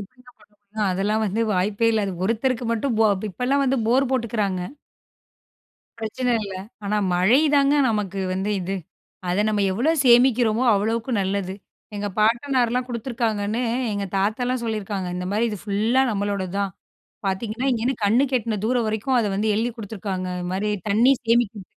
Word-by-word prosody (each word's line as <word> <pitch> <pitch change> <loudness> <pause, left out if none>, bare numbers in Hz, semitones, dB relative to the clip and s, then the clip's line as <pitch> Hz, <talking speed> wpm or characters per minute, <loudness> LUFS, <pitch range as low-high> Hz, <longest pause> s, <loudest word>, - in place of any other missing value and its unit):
எப்படிங்க 250 +5 -14
பண்ண 210 -1 -25
முடியும்? 205 0 -3
அதெல்லாம் 205 +4 0
வந்து 210 +3 0
வாய்ப்பே 205 +4 +1
இல்ல. 215 -2 +1
அது 195 - -4
ஒருத்தருக்கு 235 +3 0
மட்டும் 230 0 -1
போ 220 - +6 0.2
இப்பலாம் 260 +7 0
வந்து 265 0 +1
போர் 260 +2 +2
போட்டுக்குறாங்க. 210 -7 -1 1.4
பிரச்சன 240 +3 -1
இல்ல. 195 -1 -6 0.3
ஆனா 210 +1 0 0.2
மழைதாங்க 275 - +4
நமக்கு 200 -3 -2
வந்து 190 +3 -2
இது. 190 +2 -3 0.5
அத 180 +4 +2
நம்ம 210 -2 +1
எவ்ளோ 245 +11 +1
சேமிக்கிறோமோ 240 -1 +4
அவ்ளோக்கு 225 +5 -1
நல்லது. 190 -1 -2 0.4
எங்க 205 - -3
பாட்டனார்லாம் 245 +2 +2
குடுத்துருக்காங்கன்னு 230 -2 -2 0.3
எங்க 200 -1 -2
தாத்தாலாம் 235 +5 0
சொல்லிருக்காங்க, 205 -4 -3
இந்த 180 0 -4
மாரி 215 +3 +1
"இது 210 - -5
ஃபுல்லா 220 +5 +2
நம்மளோடது 200 -3 -2
தான்" 200 -2 -1 0.5
பாத்தீங்கன்னா 215 +6 -2
இங்கேருந்து 240 +1 -1
கண்ணு 230 +7 +4
கெட்டுன 230 -4 0
தூரம் 240 -1 +1
வரைக்கும் 220 +4 0
அத 220 - +1
வந்து 215 +2 0
எழுதி 230 +3 0
குடுத்துருக்காங்க 195 -3 -4
இது 180 - -4
மாரி 205 +3 -1 0.2
தண்ணி 230 +6 +5
சேமிக்க. 225 -4 +1
220 Hz, 150 wpm, -23 LUFS, 200-245 Hz, 1.4 s, போ